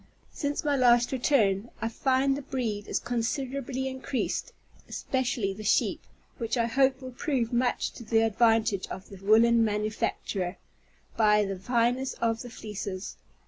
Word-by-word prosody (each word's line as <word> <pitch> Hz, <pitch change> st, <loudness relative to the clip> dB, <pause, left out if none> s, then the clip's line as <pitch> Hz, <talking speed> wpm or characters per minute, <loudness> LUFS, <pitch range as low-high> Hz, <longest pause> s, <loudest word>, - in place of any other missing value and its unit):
Since 290 Hz, -1 st, -2 dB
my 290 Hz, -2 st, +2 dB
last 240 Hz, -2 st, +4 dB
return, 235 Hz, -6 st, +2 dB
I 225 Hz, -, -1 dB
find 265 Hz, +3 st, +1 dB
the 285 Hz, -, -4 dB
breed 230 Hz, -7 st, -3 dB
is -, -, 0 dB
considerably 260 Hz, +2 st, -2 dB
increased, 260 Hz, 0 st, -3 dB, 0.4 s
especially 245 Hz, -7 st, -1 dB
the 215 Hz, +2 st, -9 dB
sheep, 210 Hz, -, +2 dB, 0.4 s
which 230 Hz, +1 st, -1 dB
I 230 Hz, -, +2 dB
hope 265 Hz, +2 st, +2 dB
will 255 Hz, -, -6 dB
prove 250 Hz, -4 st, -1 dB
much 245 Hz, +1 st, +1 dB
to -, -, -10 dB
the 225 Hz, 0 st, +2 dB
advantage 225 Hz, -2 st, +2 dB
of 190 Hz, -, -8 dB
the 195 Hz, -, -10 dB
woollen 225 Hz, +3 st, +5 dB
manufacture, 210 Hz, -3 st, -2 dB, 0.6 s
by 210 Hz, -2 st, +4 dB
the 195 Hz, -1 st, -4 dB
fineness 245 Hz, +5 st, +1 dB
of 230 Hz, -1 st, 0 dB
the 245 Hz, -, -7 dB
fleeces. 205 Hz, -4 st, -6 dB
235 Hz, 145 wpm, -28 LUFS, 215-260 Hz, 0.6 s, woollen